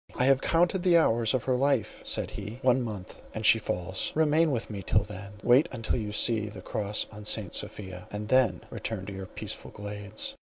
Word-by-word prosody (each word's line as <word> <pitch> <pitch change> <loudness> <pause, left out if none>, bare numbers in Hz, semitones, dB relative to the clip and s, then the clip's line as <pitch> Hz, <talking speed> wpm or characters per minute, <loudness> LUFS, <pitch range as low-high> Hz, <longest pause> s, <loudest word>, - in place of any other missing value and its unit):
"I 125 - +2
have 135 0 +4
counted 175 +2 +2
the 175 -1 +5
hours 115 -6 +3
of 125 - -1
her 130 - +1
life," 130 -4 0
said - - -1
he; 105 +3 -7
"one 130 0 +4
month, 105 -6 -6
and 110 0 -3
she 115 - +7
falls. 95 -2 -3
Remain 160 +1 +3
with 120 -5 -1
me 100 -2 -6
till 100 +2 +2
then; 100 -1 -9
wait 130 +7 +5 0.2
till - - +1
you 105 -4 -3
see 110 0 +2
the 100 -3 -10
cross 105 0 -1
on 105 0 -10
St. 105 -3 0
Sophia; 95 -3 -4
and 105 +1 -5
then 120 -10 +3
return 105 -4 -4
to 100 - -6
your 95 -1 -7
peaceful - - -7
glades." 105 0 -5
110 Hz, 205 wpm, -28 LUFS, 100-130 Hz, 0.2 s, she